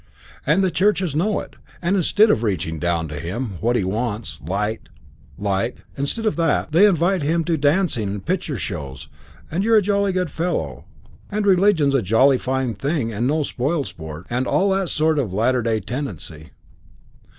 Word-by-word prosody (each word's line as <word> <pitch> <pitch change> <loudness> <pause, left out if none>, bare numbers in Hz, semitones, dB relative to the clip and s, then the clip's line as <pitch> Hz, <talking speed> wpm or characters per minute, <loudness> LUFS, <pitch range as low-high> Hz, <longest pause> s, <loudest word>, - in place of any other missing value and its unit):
And 170 +7 +3
the 185 - +2
churches 190 -5 +1
know 200 +7 +1
it; - - -13 0.2
and 180 +3 0
instead 205 +4 +4
of - - +1
reaching 90 -7 -2
down 85 -1 0
to 75 0 -5
him 95 +3 -4
what 120 +2 +1
he 110 - +1
wants 105 - -3
light, 105 +8 -3 0.5
light 100 +4 -1 0.2
instead 140 +12 -2
of 215 - 0
that, 165 -2 +1
they 180 +7 +6
invite 180 0 +2
him 165 +3 +1
to 165 0 0
dancing 145 - +1
and 100 0 -5
picture 165 -6 -1
shows, 70 -8 -6 0.4
and 175 +5 0
you're 225 +1 +4
a - - +5
jolly 200 0 +1
good 180 -3 -1
fellow, 80 - -3 0.4
and 210 0 -1
religion's 185 -7 +4
a 135 - +3
jolly 125 +7 +4
fine 130 -2 -1
thing 135 - -2
and 115 +4 0
no 155 +2 +1
spoilsport, 120 - -3
and 125 +1 -1
all 195 +1 +2
that 190 -2 0
sort 155 0 +1
of 105 -9 -2
latter 125 +4 +2
day 110 -1 0
tendency. 90 - -6
135 Hz, 175 wpm, -21 LUFS, -, 0.5 s, they